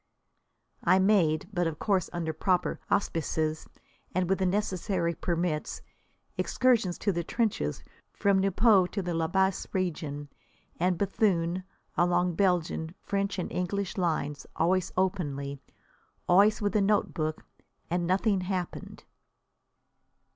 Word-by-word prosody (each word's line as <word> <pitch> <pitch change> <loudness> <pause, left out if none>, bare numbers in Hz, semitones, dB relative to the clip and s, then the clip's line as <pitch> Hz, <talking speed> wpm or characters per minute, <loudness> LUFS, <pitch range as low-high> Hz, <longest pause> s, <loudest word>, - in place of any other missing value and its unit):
I 185 +2 +5
made, 190 -6 +3
but 175 -2 +1
of 160 -2 -4
course 190 -2 0
under 165 -2 -3
proper 180 0 0
auspices 160 -4 -1 0.5
and 185 -1 +1
with 190 +1 +1
the 190 - +2
necessary 185 -3 0
permits, 170 -2 -2 0.6
excursions 235 -8 +2
to 205 - 0
the 170 -2 -2
trenches 200 - -1 0.3
from 200 -1 +2
Nieuport 195 0 +4
to 195 - -2
the 175 -1 -2
La 165 -1 0
Bassée 190 +2 0
region 150 -6 -2 0.5
and 180 +1 +2
Béthune, 185 -2 +1 0.3
along 175 0 +2
Belgian, 175 -2 0
French 200 0 -1
and 180 - -3
English 190 +1 -2
lines, 155 -5 -1
always 180 +2 +1
openly, 145 -8 -1 0.7
always 205 +4 +5
with 205 0 0
a 210 - +4
notebook. 185 -6 0 0.4
And 175 0 -1
nothing 190 +1 +2
happened! 180 -1 -4
180 Hz, 120 wpm, -29 LUFS, 165-195 Hz, 0.7 s, I